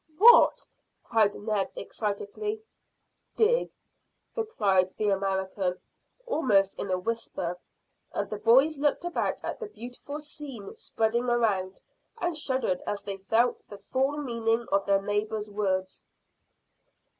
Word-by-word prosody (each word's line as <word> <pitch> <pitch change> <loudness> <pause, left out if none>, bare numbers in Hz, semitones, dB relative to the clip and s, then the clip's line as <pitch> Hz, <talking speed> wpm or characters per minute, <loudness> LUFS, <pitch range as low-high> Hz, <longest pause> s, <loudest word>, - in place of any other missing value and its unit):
"What?" 475 +6 +7 0.4
cried 220 -3 +2
Ned 205 -2 -1
excitedly. 230 - -4 0.7
"Dig," 475 +3 +3 0.7
replied 200 - +2
the 210 -1 +1
American, 190 -1 -1 0.5
almost 210 - +2
in 200 - -3
a 185 - +1
whisper, 180 -4 -3 0.5
and - - -2
the 210 - -5
boys 265 +7 +5
looked 295 +4 +1
about 350 - -1
at - - -4
the 450 - -5
beautiful 265 - -8
scene 290 -8 -8
spreading 225 +2 0
around, 210 -6 0 0.4
and 350 -6 -1
shuddered 260 -10 -1
as 205 -1 -2
they 200 -1 -4
felt 225 +5 +1
the 205 - -9
full 265 +8 -1
meaning 230 -4 0
of 195 0 +2
their 195 0 +3
neighbour's 210 +1 -2
words. 190 -2 -1
220 Hz, 120 wpm, -28 LUFS, 195-275 Hz, 0.7 s, What